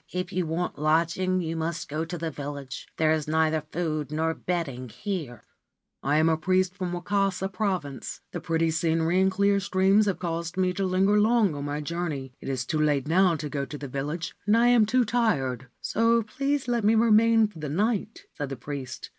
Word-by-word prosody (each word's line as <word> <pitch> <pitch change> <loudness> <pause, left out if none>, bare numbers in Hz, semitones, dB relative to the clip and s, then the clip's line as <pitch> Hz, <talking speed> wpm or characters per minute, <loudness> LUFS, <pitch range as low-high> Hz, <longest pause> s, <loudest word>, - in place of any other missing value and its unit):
If 180 0 -3
you 180 -2 0
want 170 +1 -2
lodging 170 +4 +1
you 165 -1 -3
must 165 0 -3
go 155 +3 -3
to 175 +2 -5
the 165 -1 -3
village. 140 -2 -7
There 155 -1 +3
is 155 -2 0
neither 160 0 +2
food 155 -4 -2
nor 160 +1 0
bedding 145 -9 -3
here.' 160 - -5 0.6
4 - - -4
1 145 - +3
am 160 - +4
a 160 - +2
priest 185 +2 +1
from 185 -2 -3
Wakasa 190 +1 0
Province. 185 -9 -3
The - - -5
pretty 165 0 +1
scenery 165 +2 +1
and 190 - +4
clear 200 +1 +2
streams 195 +2 +3
have 195 - 0
caused 170 0 -4
me 185 -1 +2
to 195 +1 -1
linger 195 +3 +3
long 215 -4 +3
on 145 0 -5
my 145 +1 -3
journey. 150 -5 -4
It - - -6
is 130 -2 -2
too 155 +4 -1
late 145 -2 +1
now 180 +1 +4
to 150 -1 -4
go 140 -1 -3
to 145 +2 -6
the 140 - -6
village, 145 +6 -4
and 210 +2 +5
I 240 +1 +5
am 235 -3 +5
too 250 +2 +3
tired: 135 - 0
so 230 +1 +2
please 275 +5 -2
let 240 -2 0
me 215 +2 +4
remain 225 0 +5
for 195 -6 -14
the 150 -2 -4
night,' 210 +6 -1
said 145 -2 -4
the 135 - -4
priest. 135 +1 -7
170 Hz, 205 wpm, -26 LUFS, 150-200 Hz, 0.6 s, and